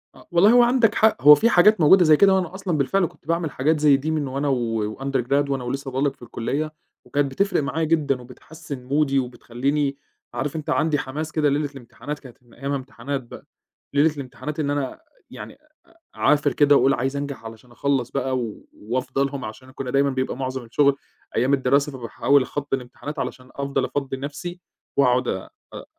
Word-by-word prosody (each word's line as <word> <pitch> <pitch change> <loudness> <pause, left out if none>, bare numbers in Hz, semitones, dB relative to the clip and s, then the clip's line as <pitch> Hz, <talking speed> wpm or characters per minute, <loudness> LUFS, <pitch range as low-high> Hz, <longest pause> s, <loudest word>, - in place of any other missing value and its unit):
آه، - - -17
والله 175 +5 +5
هو 245 0 +7
عندك 240 -3 +3
حق، 220 - +3
هو 150 +1 +10
في 225 +11 +2
حاجات 210 -1 +5
موجودة 180 +5 +7
زي 155 -1 +6
كده 195 +2 +6
وأنا 185 -1 -1
أصلًا 190 -4 -2
بالفِعل 180 +7 +2
كنت 155 - -11
باعمل 165 -2 -1
حاجات 150 +4 +1
زي 145 -2 +5
دي 150 +4 -3
من 155 -3 -1
وأنا 140 +2 -2
و 115 -5 -1
وUndergrad 135 +1 0
وأنا 135 -2 -1
ولسه 135 +2 -4
باقول 135 +2 0
لك 140 -1 0
في - - -38
الكليّة 140 +6 -3 0.3
وكانت 140 +2 0
بتفرِق 200 +3 +1
معايا 140 +4 -2
جدًا 150 -5 +1
وبتحسِّن 140 +2 -10
مودي 140 +1 +1
وبتخلّيني 135 +3 -2 0.4
عارف 135 +5 -3
أنت، 155 -2 -5
عندي 155 -1 +2
حماس 150 +4 -5
كده 150 -2 +2
ليلة 145 +1 0
الامتحانات 140 +2 -8
كانت 130 -4 -14
من 120 - -23
أيامها 140 +1 -3
امتحانات 135 +1 -5
بقى، 120 - -12 0.5
ليلة 150 +2 +3
الامتحانات 145 +2 -7
إن 145 -2 0
أنا 145 -2 -2 0.3
يعني - - -9
أ - - -23 0.6
أعافِر 145 -2 +2
كده 145 +2 +5
وأقول 135 - +4
عايز 130 +3 -1
أنجَح 140 -4 -5
علشان 115 +2 -11
اخلّص 130 0 -1
بقى 130 0 -1
و 115 -4 -6
وأفضى 130 +4 -2
لهم 135 -3 -5
علشان 120 +5 -10
كنّا 130 -1 -5
دايمًا 140 +1 +3
بيبقى 130 -2 -2
مُعظَم 130 -1 -4
الشُغل 140 +4 +3 0.4
أيام 130 +4 +2
الدراسة 140 +2 +2
فباحاول 135 +2 +1
أخطّي 145 +1 -3
الامتحانات 135 +4 -8
علشان 130 -1 -5
أفضَل 140 0 -1
أفضّي 135 -2 -3
نَفسي 155 +6 -6 0.4
وأقعُد 125 -2 +3
أ 95 - -3 0.2
أ - - -7
140 Hz, 190 wpm, -23 LUFS, 130-150 Hz, 0.6 s, هو